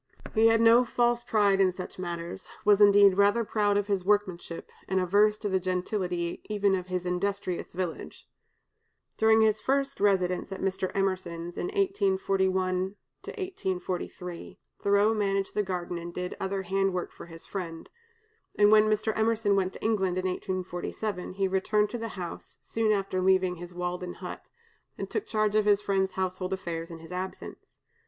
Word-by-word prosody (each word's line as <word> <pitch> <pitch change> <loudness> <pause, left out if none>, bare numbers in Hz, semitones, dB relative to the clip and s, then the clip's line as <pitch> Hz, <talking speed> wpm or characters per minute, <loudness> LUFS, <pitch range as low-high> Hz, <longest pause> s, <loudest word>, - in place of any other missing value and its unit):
He 225 0 +5
had 225 0 +4
no 230 +2 +7
false 240 0 +1
pride 205 -4 +2
in 185 -1 +4
such 185 0 -8
matters, 175 0 -5 0.2
was, 205 0 +5
indeed, 200 -1 +7
rather 205 +4 +4
proud 205 -1 +1
of 205 - +1
his 200 -3 -1
workmanship, 185 -4 -1 0.2
and 190 0 +1
averse 205 +4 +3
to 210 - -4
the 190 -1 +1
gentility 180 -1 -2
even 205 -2 +1
of 185 -1 -2
his 180 -1 -3
industrious 185 0 -2
village. 180 -2 -5 0.9
During 220 0 +5
his 215 -1 +2
first 275 +1 0
residence 185 -2 +1
at 195 - -5
Mr. 190 -1 -1
Emerson's 175 -3 -2
in - - -3
1841 190 - 0 0.8
43, 180 -1 -6 0.2
Thoreau 200 +2 +3
managed 195 -2 0
the 210 - +1
garden 180 -3 -3
and 170 0 -7
did 180 +1 -4
other 195 0 -2
hand 195 +1 0
work 180 - -3
for - - -12
his 165 -1 -11
friend; 170 -4 -6 0.7
and 205 0 +5
when 215 0 +6
Mr. 215 +1 +1
Emerson 220 -2 +2
went 190 -1 0
to - - -11
England 190 -5 +1
in 185 - -2
1847, 185 +1 -4
he 195 0 0
returned 210 +2 +1
to 240 - -4
the 230 - -3
house 175 -2 -7
(soon 225 -1 0
after 195 -2 0
leaving 185 -1 +2
his 175 +1 -9
Walden 180 0 -4
hut), - - -8 0.5
and - - -5
took 430 0 -2
charge 215 - +1
of 215 -1 +3
his 205 -1 +4
friend's 190 -2 0
household 185 0 -2
affairs 170 -3 -4
in 165 - -8
his 165 +1 -13
absence. 185 +1 -7
195 Hz, 165 wpm, -28 LUFS, 180-210 Hz, 0.9 s, no